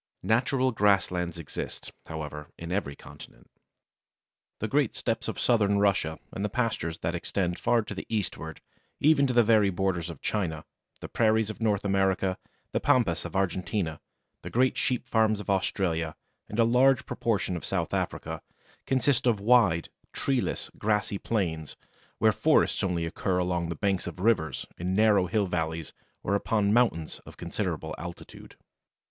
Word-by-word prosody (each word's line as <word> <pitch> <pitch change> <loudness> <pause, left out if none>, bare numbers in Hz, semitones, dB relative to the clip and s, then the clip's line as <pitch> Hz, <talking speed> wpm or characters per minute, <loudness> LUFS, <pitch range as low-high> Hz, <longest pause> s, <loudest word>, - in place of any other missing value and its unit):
Natural 130 +3 +2
grasslands 90 -5 +1
exist, 80 -3 -6 0.2
however, 75 -2 -6
in 85 +1 -7
every 90 -7 -2
continent. - - -14 1.1
The - - -2
great - - +1
Steppes - - -2
of - - -4
Southern 105 -4 +3
Russia 100 -6 +2 0.2
and 100 - -3
the 105 - 0
pastures 100 -8 -1
that 80 +1 -1
extend 90 0 -2
far 120 -2 +2
to - - -6
the - - -7
eastward 90 -7 -3 0.4
even 145 -2 +4
to 125 - -1
the 120 -1 +6
very 105 -2 +4
borders 90 -2 -1
of 80 -5 -8
China, 80 -7 -2 0.4
the - - -5
Prairies 110 -1 +2
of 110 - -12
North 105 -2 +1
America, 95 -1 +1 0.3
the - - 0
Pampas 85 -11 +2
of 85 +1 -7
Argentina, 95 -3 -1 0.4
the - - -7
great 125 +1 +2
sheep 125 0 0
farms 110 -2 +2
of 100 -1 -2
Australia, 85 -4 0 0.3
and 105 - -5
a 115 - +5
large 125 +3 +4
proportion 100 -5 -1
of 85 - -5
South - - -2
Africa, - - -3 0.5
consist 130 -1 +2
of 115 -4 +3
wide, 100 -7 +4 0.2
treeless, 135 -3 -1
grassy 105 -1 0
plains, 80 -9 -2 0.4
where - - +4
forests - - +2
only 90 -3 0
occur 90 +3 -1
along 90 -2 0
the 85 - -3
banks 95 +3 0
of - - -6
rivers, 90 - +1
in 90 +2 -1
narrow 105 -3 +4
hill 105 +2 +1
valleys, 80 -3 -3 0.3
or 100 - 0
upon 100 0 +1
mountains 110 -10 +1
of - - -14
considerable - - -3
altitude. 85 0 -9
100 Hz, 155 wpm, -28 LUFS, 85-110 Hz, 1.1 s, the